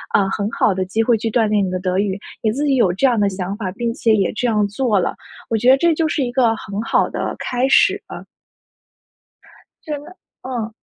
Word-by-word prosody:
呃， 195 -1 +3
很 205 0 -2
好 210 - +1
的 185 0 -1
机 215 +5 0
会 235 0 +3
去 225 - -2
锻 225 0 +2
炼 210 -1 +2
你 190 - -1
的 185 0 -2
德 185 0 -1
语。 200 -1 -1 0.2
你 220 - +1
自 285 +6 -2
己 275 - +2
有 205 -7 +3
这 190 +10 0
样 240 -4 +3
的 205 -1 +2
想 190 0 -4
法， 195 -4 -4
并 235 +1 -2
且 225 -3 +2
也 195 -3 +1
这 245 - -1
样 210 -3 +2
做 210 -1 0
了， 175 - -1 0.4
我 225 - +2
觉 245 +4 +3
得 265 - +7
这 340 +2 +3
就 320 0 0
是 300 -2 -1
一 245 - -3
个 240 -3 +2
很 205 -1 -5
好 - - +1
的 - - -3
开 250 +1 -1
始 270 - +4
了。 - - -8 1.6
真 295 -2 -5
的， 365 - -14 0.2
嗯。 235 -4 -4
225 Hz, 255 characters per minute, -19 LUFS, 200-250 Hz, 1.6 s, 得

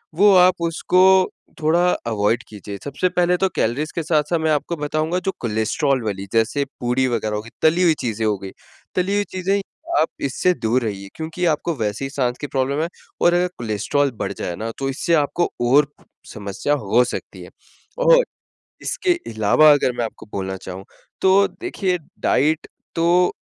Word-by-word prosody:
वो 200 +3 +6
आप 180 -1 +5
उसको 175 +2 +1 0.6
थोड़ा 170 +3 +3 0.2
अवॉइड 110 +1 +1
कीजिए। 100 -1 -8
सबसे 145 +6 -1
पहले 180 0 +2
तो 190 +1 +1
कैलरीज़ 140 +8 0
के 165 - -1
साथ-साथ 155 +1 +1
मैं 160 0 +1
आपको 155 +3 0
बताऊँगा, 155 +3 -1
जो 190 +1 -2
कोलेस्ट्रोल 120 +5 0
वाली, 100 -2 -3
जैसे 115 +5 +1
पूरी 125 +2 +1
वगैरह 110 -3 -1
हो 105 - -2
गईं, 115 +2 -13
तली 165 +3 +4
हुई 170 -3 +5
चीज़ें 110 -1 -1
हो 105 -2 +1
गईं, 95 0 -8 0.4
तली 185 +2 +1
हुई 205 - +2
चीज़ें, 190 +2 +1 0.4
आप 160 - +3
इससे 140 +7 +1
दूर 120 -2 0
रहिए 100 -3 -4
क्योंकि 165 +3 -3
आपको 160 +3 -1
वैसे 110 -1 -2
ही - - -4
साँस 125 -3 -1
की 145 - -3
प्रॉब्लम 140 +2 -1
है 165 - 0 0.3
और 175 - +5
अगर 175 +1 +2
कोलेस्ट्रोल 120 +5 0
बढ़ 100 - -2
जाए 90 - -4
ना, 110 +5 -4
तो 135 0 -2
इससे 145 +5 -1
आपको 170 +4 0 0.2
और 145 +2 +5 0.5
समस्या 105 +7 -2
हो 110 +5 +4
सकती - - -6
है - - -11 0.6
और - - +7 0.6
इसके 390 -8 0 0.2
अलावा 110 +9 +5
अगर 145 -3 +2
मैं 120 - +1
आपको 110 - -8
बोलना 95 -1 -3
चाहूँ, 95 0 -8 0.4
तो 190 +1 +5
देखिए, 195 - -2 0.2
डाइट 155 +3 +1 0.3
तो 175 +2 +3
145 Hz, 175 wpm, -21 LUFS, 110-175 Hz, 0.6 s, और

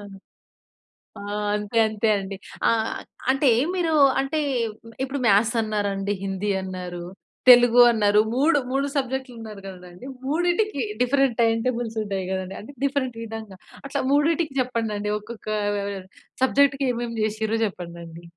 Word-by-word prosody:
ఆ! 205 - -10 1.5
అంతే 210 +2 -3
అంతే 215 +1 -1
అండి 195 0 -6 0.3
ఆహ్, 225 -1 +1 0.4
అంటే 270 0 +3 0.3
మీరు 340 -3 0 0.3
అంటే, 280 +3 -1 0.6
ఇప్పుడు 270 +1 -3
మ్యాథ్స్ 215 +3 +4
అన్నారండి. 205 -2 -1
హిందీ 195 +1 -2
అన్నారు. 180 -2 -6 0.5
తెలుగు 245 -1 +8
అన్నారు. 210 -2 +3
మూడు 290 +4 +3
మూడు 275 +1 0
సబ్జెక్ట్‌లు 265 -2 -2
అన్నారు 215 -3 -9
గదండి. 180 +3 -11 0.2
మూడింటికి 350 - 0 0.2
డిఫరెంట్ 265 -1 +2
టైమ్ 225 0 +2
టేబుల్స్ 235 -3 -2
ఉంటాయి 195 -2 -3
గదండీ, 190 0 -4
అంటే 255 +7 -11
డిఫరెంట్ 265 -4 -1
విధంగా, 220 -4 -8 0.3
అట్లా 280 0 -2
మూడిటికి 305 0 +2
చెప్పండండి. 220 -4 -2
ఒక్కొక్క 220 +1 -11 0.3
ఆహ్, 200 0 -3 0.5
సబ్జెక్ట్‌కి 275 0 +3
ఏమేమి 235 -1 -4
జేసిర్రో 220 +1 -1
చెప్పండండి. 170 -3 -8
225 Hz, 125 wpm, -24 LUFS, 205-270 Hz, 1.5 s, తెలుగు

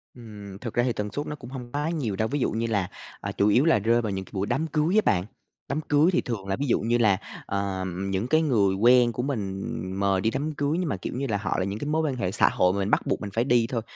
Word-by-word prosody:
Ừm, 105 -5 -10
thực 120 -3 -5
ra 120 - +2
thì 125 -2 +1
tần 105 -1 -4
suất 145 +5 -3
nó 150 - -4
cũng 125 -3 -11
hông 125 -3 -8
quá 150 +3 -1
nhiều 130 - -2
đâu, 110 +2 0
ví 145 +3 -2
dụ - - +1
như 115 +2 -1
là, 100 -4 0 0.3
ờ, - - -4
chủ 100 - +3
yếu 125 +9 +4
là 160 -10 +4
rơi 115 +3 +2
vào 110 - -2
những 95 0 -4
cái - - -19
buổi 100 +1 -1
đám 145 +7 0
cưới 155 +6 +1
á 215 - +6
bạn, 90 0 +2 0.4
đám 145 +3 -1
cưới 150 +3 +3
thì 180 - +2
thường 105 -6 -5
là 95 - 0
ví 145 - -2
dụ - - +3
như 120 +2 +1
là, 105 -5 +4 0.3
ờm, 95 -1 -3
những 95 +5 -1
cái 155 +3 +3
người 105 -10 +2
quen 120 +3 +5
của 125 +2 -3
mình 100 -8 -3 0.4
mời 100 -1 +2
đi 110 - +2
đám 145 +3 -2
cưới 145 +4 0
nhưng 175 -5 -1
mà, 95 - -1
kiểu - - -5
như 135 +1 -2
là, 105 -3 0
họ 100 - -2
là 95 - 0
những 100 +2 -4
cái 145 - -4
mối 160 +1 +2
quan 145 -5 -1
hệ 95 -6 -2
xã 105 - +4
hội 90 +1 +2
mà 100 - -2
mình 100 +1 -1
bắt - - +4
buộc - - 0
mình 100 - -4
phải 115 - +2
đi 120 -3 +3
thôi. 115 -3 -1
115 Hz, 305 wpm, -26 LUFS, 100-140 Hz, 0.4 s, á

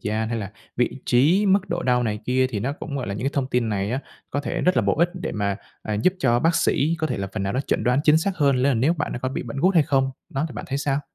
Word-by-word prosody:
gian 110 +1 -1
hay 115 0 -2
là 100 -2 -5 0.3
vị 125 - +2 0.2
trí, 160 +12 +4
mức 195 0 +3
độ 175 0 -2
đau 125 -1 +2
này 105 -3 -1
kia 130 +1 +2
thì 110 -6 -4
nó 135 +5 -1
cũng, 145 -1 -6
gọi 125 - -3
là, 100 - -3
những 105 - -4
cái 140 - +1
thông 135 -2 0
tin 120 -2 +1
này 100 -1 -1
á, 130 +3 -1 0.3
có 145 - -1
thể - - -3
rất 180 - +2
là 125 - +4
bổ 100 - +2
ích 170 +2 +3
để 180 - -4
mà, 100 -2 -1 0.3
à, 105 - -3
giúp 145 - +2
cho 120 -7 +3
bác 165 +6 +2
sĩ 160 +2 +2
có 155 - 0
thể 125 - -3
là 100 -1 -3
phần 105 - -3
nào 100 +1 -1
nó 130 - 0
chẩn - - -1
đoán 125 +3 +3
chính 150 0 +6
xác 190 +3 -2
hơn, 140 -4 +3
đó 140 - +3
là 135 - +3
nếu 130 +8 +3
bạn 150 - -3
đã - - -4
có 130 - -2
bị 130 - -4
bệnh 140 - -7
gút 185 +3 +3
hay 160 - +6
không. 135 -1 +1 0.2
Đó, 135 +3 -2
thì - - -10
bạn 105 - -5
thấy 135 - -1
sao? 140 0 0
130 Hz, 330 wpm, -23 LUFS, 115-150 Hz, 0.3 s, chính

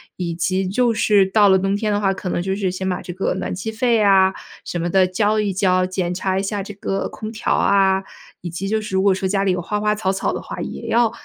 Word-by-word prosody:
以 175 -2 -3
及 185 +3 -1
就 235 +5 +1
是 210 -3 +3
到 205 0 +5
了 190 0 +5
冬 195 +1 0
天 210 +1 -1
的 205 - +1
话， 195 -2 +1
可 190 -1 -5
能 175 - -1
就 190 +2 -2
是 195 -2 -1
先 190 +1 -4
把 180 - -2
这 - - -7
个 185 +2 -1
暖 190 - -4
气 185 +5 -4
费 230 +2 +1
呀 195 -3 +4 0.3
什 175 - -4
么 170 +1 -1
的 190 +1 +4
交 205 +4 +1
一 205 -1 -1
交， 185 -1 +2
检 185 -1 -2
查 190 +1 -1
一 - - 0
下 200 0 -3
这 205 - -8
个 195 0 -3
空 215 - -7
调 230 +1 -1
啊。 190 -1 +3 0.4
以 175 - -5
及 175 +4 -4
就 220 +1 +1
是 210 -3 -5
如 190 - +2
果 200 -1 +4
说 190 0 -2
家 195 +1 0
里 195 - +2
有 180 -1 -1
花 210 +4 -3
花 210 0 +2
草 210 -3 -2
草 195 - -1
的 - - -4
话， - - -7
也 - - -6
要 235 -1 +3
195 Hz, 295 characters per minute, -20 LUFS, 185-210 Hz, 0.4 s, 到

